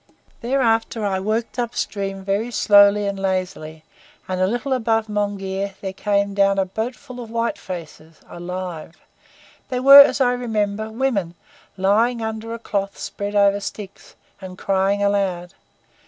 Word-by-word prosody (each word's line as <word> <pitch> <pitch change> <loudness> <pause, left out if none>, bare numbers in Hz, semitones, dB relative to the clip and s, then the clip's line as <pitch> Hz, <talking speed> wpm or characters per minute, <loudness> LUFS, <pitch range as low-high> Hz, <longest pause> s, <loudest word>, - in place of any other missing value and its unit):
"Thereafter 230 -3 0
I 190 -2 0
worked 220 +5 -2
up 240 -1 -2
stream 195 -1 -3
very 200 +4 -1
slowly 205 -2 +5
and 200 -1 -3
lazily, 185 -5 -3 0.4
and 185 0 -2
a 185 - +3
little 240 +6 -2
above 225 -3 +1
Monghyr 200 -2 -3
there 190 -1 -5
came 200 0 0
down 195 0 +2
a 195 - +2
boatful 245 +6 -6
of 235 -2 -8
white 230 +1 -2
faces 165 -3 -9
alive! 175 -2 -7 0.7
They 250 - -2
were, 275 +2 +10
as 280 - +3
I 250 -2 +3
remember, 220 -3 -2
women, 220 -8 -2 0.4
lying 220 +6 +2
under 220 0 -5
a 230 - -4
cloth 200 -3 -3
spread 205 0 -5
over 200 0 +4
sticks, 200 -1 -9 0.3
and 185 -1 -9
crying 195 +1 0
aloud. 195 -3 -1
200 Hz, 145 wpm, -21 LUFS, 190-225 Hz, 0.7 s, were